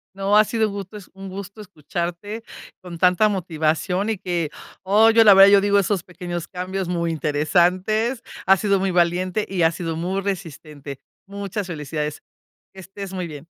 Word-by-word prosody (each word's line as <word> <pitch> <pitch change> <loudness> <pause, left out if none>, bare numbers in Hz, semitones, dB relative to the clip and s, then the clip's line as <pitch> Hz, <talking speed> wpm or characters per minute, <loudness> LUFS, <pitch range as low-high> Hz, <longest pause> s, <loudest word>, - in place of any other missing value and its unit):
No, 195 +1 +1
ha 215 - +8
sido 220 0 0
gusto 200 +1 -7
es 205 - -11
un 195 0 -9
gusto 200 +2 -8
escucharte 180 +3 -5 0.4
con 175 -2 -9
tanta 180 +4 +4
motivación. 180 +1 -1
Y 220 - -2
que, 175 -4 -2 0.3
oh, 210 +4 +5
yo 225 0 +6
la 205 - +8
verdad, 195 +1 +8
yo 200 - +7
digo 200 0 +2
esos 195 -2 0
pequeños 175 -2 -6
cambios 185 0 -4
muy 170 -1 -1
interesantes, 180 - +1 0.2
has 190 -1 +5
sido 200 -2 +2
muy 195 0 0
valiente 180 +3 +1
y 185 -3 -1
has 165 0 +3
sido 165 -2 -4
muy 180 +4 -2
resistente, 155 -7 -6 0.3
muchas 200 0 -5
felicidades, 150 -2 -4 0.5
que 190 - -13
estés 195 +1 -9
muy 180 -2 -4
bien. 150 -1 -10
185 Hz, 170 wpm, -22 LUFS, 170-200 Hz, 0.5 s, ha